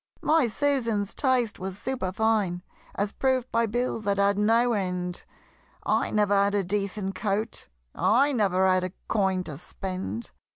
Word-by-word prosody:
My 315 -5 +4
Susan's 230 -5 0
taste 255 -5 +1
was 190 0 -5
superfine, 205 -5 0 0.3
As 200 0 -1
proved 260 -1 0
by 230 0 +2
bills 240 +1 -1
that 200 -1 0
had 200 0 +3
no 230 +4 +3
end 180 -3 -3 0.6
I - - +1
never 210 -1 +2
had 200 0 +3
a 200 - +2
decent 200 +1 -2
coat 210 +3 -2 0.3
I 275 +6 +3
never 190 -5 +2
had 185 -1 +3
a 185 0 -4
coin 190 -3 +1
to 150 -5 -7
spend! 185 - -5
205 Hz, 150 wpm, -26 LUFS, 190-230 Hz, 0.6 s, My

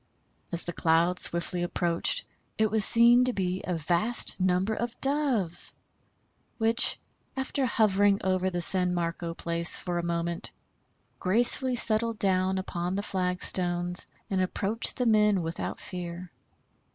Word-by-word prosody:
As 170 0 -1
the 175 - -6
cloud 170 +3 +1
swiftly 170 +1 -1
approached 175 - -1 0.3
it 220 -1 +1
was 220 -1 +3
seen 235 +3 +6
to 255 - +1
be 185 -2 -3
a 180 - -3
vast 175 +8 +2
number 185 +3 +1
of 235 +2 -5
Doves, 270 - +1 0.8
which, 225 0 +2 0.4
after 265 0 -2
hovering 205 -3 +2
over 185 0 0
the 175 -2 -2
San 180 0 +1
Marco 170 0 -4
Place 170 0 +3
for 175 -2 -4
a - - -4
moment, 170 0 -3 0.7
gracefully 240 +6 +1
settled 230 -1 0
down 190 -1 0
upon 180 -1 -4
the 200 - -3
flagstones 180 -1 0 0.2
and 190 -1 -1
approached 200 +4 +1
the 250 - -1
men 210 -4 +2
without 165 +1 -5
fear. 175 -1 -8
185 Hz, 135 wpm, -27 LUFS, 175-220 Hz, 0.8 s, seen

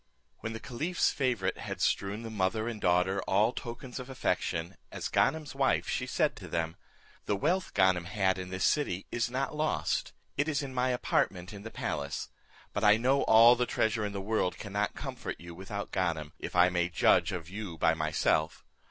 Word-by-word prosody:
When 110 - -4
the 110 - -5
caliph's 160 +11 0
favourite 125 -8 0
had - - -5
strewn 100 +3 0
the 115 - -6
mother 110 +2 0
and 115 -3 -5
daughter 90 +2 +2
all 105 +5 +3
tokens 125 +2 -6
of 125 +1 -8
affection, 90 -8 -1 0.2
as - - -4
Ganem's 155 +1 +1
wife, 135 -1 +1
she 125 - -1
said 155 +3 +1
to 95 - -9
them, 80 0 -2 0.5
"The 105 - +2
wealth 175 - 0
Ganem 95 -2 +3
had 95 0 +1
in 90 0 -6
this 95 0 -3
city 100 - +1
is 120 0 0
not 130 +4 -2
lost, 155 +1 0 0.3
it 145 +2 +1
is 145 -2 0
in 135 -1 -6
my 130 0 +1
apartment 95 -6 0
in 100 - -8
the 115 - -7
palace; 70 -8 -3 0.4
but - - -2
I 105 0 +7
know 130 +4 +2
all 115 +2 +8
the 125 0 0
treasure 110 -1 +1
of 100 -1 -3
the 100 - -3
world 100 -2 0
cannot 100 0 -2
comfort - - -5
you 85 0 -9
without 95 +3 -6
Ganem, 80 -5 -1
if - - -6
I 90 +1 +6
may 90 -1 0
judge 85 - +3
of 85 -3 -5
you 95 -2 -6
by 80 - +3
myself. 80 0 0
105 Hz, 195 wpm, -30 LUFS, 90-125 Hz, 0.5 s, all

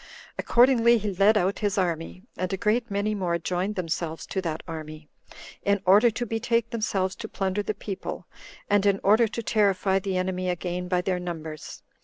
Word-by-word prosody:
Accordingly, 240 -1 +5
he 210 -2 -3
led 200 +4 +4
out 190 +1 0
his 205 -1 -1
army, 175 0 -2
and 185 -1 -3
a 195 - -1
great 230 +5 0
many 205 +1 -1
more 180 -4 0
joined 180 +4 -2
themselves 165 -2 -3
to 190 - -3
that 160 -3 -4
army, 155 -2 -8 0.5
in 200 0 +2
order 205 +6 +6
to 240 +2 -3
betake 230 +1 0
themselves 195 -4 -1
to 220 - -6
plunder 195 -1 -1
the 210 +1 -3
people, 200 -2 -6 0.4
and 205 0 +3
in 195 -1 +3
order 220 +4 +5
to 235 +1 -5
terrify 195 -3 +2
the 190 -1 -2
enemy 185 0 -1
again 180 0 -3
by 180 0 +1
their 180 0 -1
numbers. 160 -3 -7
195 Hz, 180 wpm, -26 LUFS, 180-210 Hz, 0.5 s, order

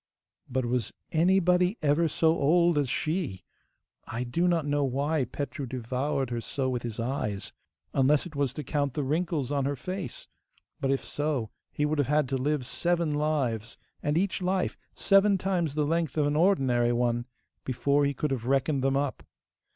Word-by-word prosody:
But 130 -1 0
was 120 -2 -1 0.2
anybody 180 +3 +3
ever 150 +3 +3
so 160 +2 +2
old 170 +3 +3
as 140 -3 0
she! 155 - -2 0.6
I 115 +2 -3
do 145 +9 0
not 170 -3 +2
know 145 0 +1
why 140 +2 0
Petru 140 +1 -5
devoured 130 +2 -2
her 120 -1 -2
so 130 +2 -2
with 125 -2 -2
his 115 -2 -5
eyes, 115 -5 -3 0.4
unless 140 +2 +3
it 165 -4 -9
was 140 -3 +1
to 150 - -4
count 140 -1 -1
the 150 - 0
wrinkles 155 -1 -1
on 140 -2 0
her 140 +1 0
face; 185 +7 -6 0.5
but 135 - -1
if 135 0 0
so 145 -7 -2 0.2
he 150 - 0
would 150 0 0
have 145 - +2
had 150 -1 +2
to 135 - 0
live 140 0 0
seven 170 +2 0
lives, 140 -7 -1 0.2
and 150 +1 0
each 195 +2 0
life 185 0 0 0.2
seven 195 0 +4
times 175 -6 -1
the 150 -1 +1
length 160 -1 -1
of 150 - +3
an 145 0 +1
ordinary 135 -9 +3
one, 120 0 0 0.4
before 140 +3 +1
he 140 0 +1
could 150 +1 -1
have 125 -3 -2
reckoned 135 +1 +1
them 135 0 +2
up. 140 -1 -2
145 Hz, 180 wpm, -28 LUFS, 130-160 Hz, 0.6 s, seven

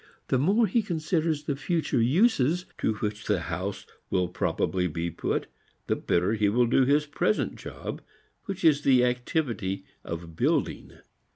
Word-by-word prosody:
The 130 - +3
more 200 - +4
he 220 +4 +2
considers 160 -4 -1
the 145 -2 -2
future 150 -4 0
uses 170 - +3
to 110 - +1
which 105 0 -4
the 105 - +2
house 90 +4 -4 0.2
will 90 -2 +1
probably 90 +2 0
be 85 +1 -3
put - - -2 0.4
the - - +1
better 90 +5 +1
he 105 -2 +2
will 120 +4 +3
do 125 +2 +3
his 145 +3 +3
present 175 +7 0
job - - -7 0.4
which 195 -3 -5
is 150 -2 +5
the 130 -3 +5
activity 125 - -1 0.2
of 85 -1 -6
building. - - 0
125 Hz, 155 wpm, -27 LUFS, 100-160 Hz, 0.4 s, is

